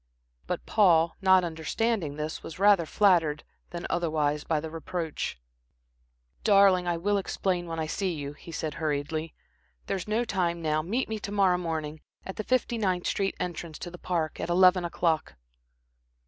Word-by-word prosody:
But - - -3
Paul, 170 -6 +4
not 190 -1 +5
understanding 165 +1 -1
this 150 +1 -4
was 160 - -9
rather 195 -4 +4
flattered 170 -8 +3 0.3
than 170 -1 -6
otherwise 155 -3 0
by 160 -2 0
the 160 +1 -6
reproach. 165 - -4 1.0
"Darling, 195 -3 +5
I 170 -1 +1
will 200 +4 +1
explain 185 -2 -2
when 165 -1 -4
I 160 - -1
see 185 +4 -1
you," 145 -3 -5
he 160 +3 -12
said, 155 -1 -3
hurriedly. 155 +1 -2 0.5
"There's 190 0 -3
no 220 +3 +1
time 175 -5 0
now. 155 -1 0
Meet 220 +11 -1
me 220 -1 -3
to 205 - -6
morrow 190 -3 +3
morning 160 -3 -4 0.2
at 190 - -6
the 215 - -2
Fifty 245 -1 0
ninth 185 -4 0
street 195 -1 0
entrance 170 -2 -4
to 175 - -7
the 175 - -10
Park, 165 -4 -2
at - - -3
eleven 180 +1 +5
o'clock." 165 - 0
175 Hz, 165 wpm, -28 LUFS, 160-195 Hz, 1.0 s, not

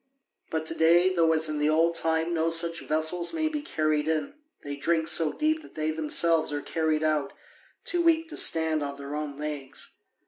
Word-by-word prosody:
But 160 0 -3
to 160 - -1
day, 170 +3 +4
though 165 -2 +3
as 160 0 +3
in 155 -1 -3
the 150 +1 +2
old 165 +2 +3
time 165 0 0
no 165 0 +1
such 165 0 0
vessels 160 - 0
may 320 -1 0
be 305 -1 -3
carried 155 - -1
in, 160 - -1 0.3
they 145 0 -5
drink 160 +2 0
so 160 -2 +4
deep 315 +1 0
that - - -16
they 155 0 -1
themselves 160 +1 +1
are 145 -1 -3
carried 160 -1 -1
out, 155 -3 0 0.5
too 350 - 0
weak 330 -1 +3
to - - -7
stand 160 -1 +2
on 140 -1 -4
their 140 0 -7
own 150 -2 -5
legs. 150 -3 -6
160 Hz, 200 wpm, -27 LUFS, 155-170 Hz, 0.5 s, day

